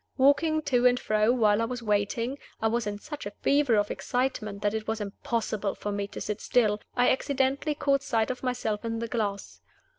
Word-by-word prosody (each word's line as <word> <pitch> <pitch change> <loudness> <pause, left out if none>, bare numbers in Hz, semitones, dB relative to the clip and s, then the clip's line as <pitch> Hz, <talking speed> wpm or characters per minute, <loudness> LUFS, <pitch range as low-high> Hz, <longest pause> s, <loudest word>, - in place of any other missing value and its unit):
Walking 310 +4 +3
to 250 -3 +3
and 250 0 +3
fro 215 +1 +2
while 220 -3 +3
I - - +2
was 245 0 -5
waiting 230 +5 0 0.2
I 220 - +1
was 235 0 -1
in 205 0 -3
such 295 0 -7
a - - -6
fever 280 -4 +4
of 205 0 +1
excitement 230 -5 -2
that 205 0 +1
it 220 0 -3
was 220 0 -1
impossible 215 -1 -2
for 205 - -4
me 200 0 -2
to - - -8
sit 210 -1 -4
still 215 -4 +2
I 245 0 +4
accidentally 275 +2 0
caught 275 -1 +2
sight 225 -3 0
of 255 - -6
myself 245 -4 -2
in 230 0 -2
the 230 0 -3
glass. 210 -4 -3
230 Hz, 205 wpm, -28 LUFS, 210-260 Hz, 0.2 s, fever